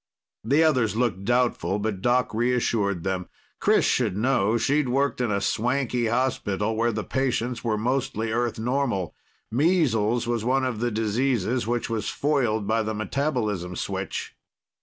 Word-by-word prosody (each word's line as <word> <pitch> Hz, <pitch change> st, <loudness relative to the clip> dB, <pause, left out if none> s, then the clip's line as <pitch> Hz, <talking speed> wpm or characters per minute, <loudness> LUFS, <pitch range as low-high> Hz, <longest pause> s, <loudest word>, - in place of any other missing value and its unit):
The 140 Hz, +8 st, +3 dB
others 125 Hz, -10 st, +2 dB
looked 110 Hz, -5 st, -1 dB
doubtful, 120 Hz, -4 st, +1 dB
but 105 Hz, -2 st, -3 dB
Doc 125 Hz, +3 st, +1 dB
reassured 110 Hz, -6 st, 0 dB
them. 95 Hz, -2 st, -2 dB, 0.3 s
Chris -, -, +3 dB
should 90 Hz, -, +1 dB
know; 115 Hz, -2 st, +2 dB
she'd 140 Hz, +2 st, +1 dB
worked 135 Hz, +1 st, +1 dB
in 120 Hz, -, 0 dB
a 100 Hz, -1 st, +1 dB
swanky 125 Hz, +2 st, 0 dB
hospital 110 Hz, -3 st, 0 dB
where 115 Hz, +2 st, +1 dB
the 110 Hz, -1 st, -3 dB
patients 125 Hz, -2 st, -1 dB
were 110 Hz, -3 st, 0 dB
mostly 115 Hz, -1 st, -1 dB
Earth 120 Hz, 0 st, -1 dB
normal. 120 Hz, -, -1 dB, 0.4 s
Measles 120 Hz, -, +2 dB
was 120 Hz, -2 st, -1 dB
one 130 Hz, +2 st, +1 dB
of 125 Hz, -4 st, -2 dB
the 120 Hz, +1 st, 0 dB
diseases 115 Hz, +1 st, 0 dB
which 120 Hz, 0 st, -1 dB
was 110 Hz, -3 st, -2 dB
foiled 125 Hz, -8 st, 0 dB
by 110 Hz, +2 st, +1 dB
the 110 Hz, 0 st, -3 dB
metabolism 110 Hz, -, -2 dB
switch. -, -, -4 dB
115 Hz, 150 wpm, -25 LUFS, 105-125 Hz, 0.4 s, The